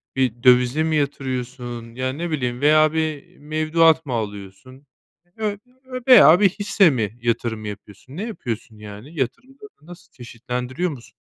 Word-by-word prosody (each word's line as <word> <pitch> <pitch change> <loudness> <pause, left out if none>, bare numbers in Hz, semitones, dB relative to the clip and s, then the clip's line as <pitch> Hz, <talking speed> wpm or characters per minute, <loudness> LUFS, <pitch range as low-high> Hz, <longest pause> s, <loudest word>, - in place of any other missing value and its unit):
bir 125 -3 -1
dövize 125 +3 +4
mi 160 0 0
yatırıyorsun? 125 -4 -4
Ya, 130 +1 -2
ne 165 +3 -5
bileyim 125 -4 -2
veya 155 +1 +4
bir 155 -3 -3
mevduat 155 +2 +2
mı 130 - -4
alıyorsun 110 +5 -7 0.5
ö 210 -2 -2 0.3
ö 255 -1 -7
veya 180 - +8
bir 205 -1 +5
hisse 200 -1 +2
mi 115 -5 -2
yatırım 115 -2 -2
yapıyorsun? 105 - -10
Ne 195 - -3
yapıyorsun 115 - -6
yani, 105 +10 -10
yatırımlarını 255 - -5
nasıl 175 +2 -15
çeşitlendiriyor 125 +6 -5
musun? 125 -5 -12
135 Hz, 145 wpm, -21 LUFS, 120-160 Hz, 0.5 s, veya